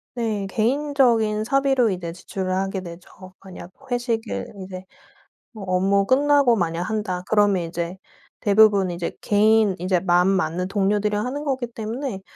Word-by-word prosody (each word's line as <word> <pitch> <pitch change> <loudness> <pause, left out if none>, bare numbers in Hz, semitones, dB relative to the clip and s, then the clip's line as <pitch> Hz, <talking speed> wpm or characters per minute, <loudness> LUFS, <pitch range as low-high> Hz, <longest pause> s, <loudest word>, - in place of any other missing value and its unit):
네. 220 -4 -2
개인적인 235 -3 +1
사비로 270 -2 +2
이제 175 -3 -4
지출을 185 +1 -5
하게 195 0 -2
되죠. 185 +1 -12
만약 185 -2 -11 0.2
회식을 230 - -2 0.2
이제 185 -1 -8 0.7
뭐 215 -4 -10
업무 195 +2 +2
끝나고 280 0 +3
만약 170 -3 -1
한다 210 -3 -3
그러면 205 -4 +3
이제 170 +2 -4 0.4
대부분 205 -2 +4
이제 170 -1 -4
개인 215 -1 +3
인제 180 0 0
마음 175 -1 +3
맞는 180 -2 0
동료들이랑 205 +1 0
하는 280 +4 -4
거기 265 -4 -2
때문에 230 -1 -5
205 Hz, 310 characters per minute, -22 LUFS, 185-230 Hz, 0.7 s, 대부분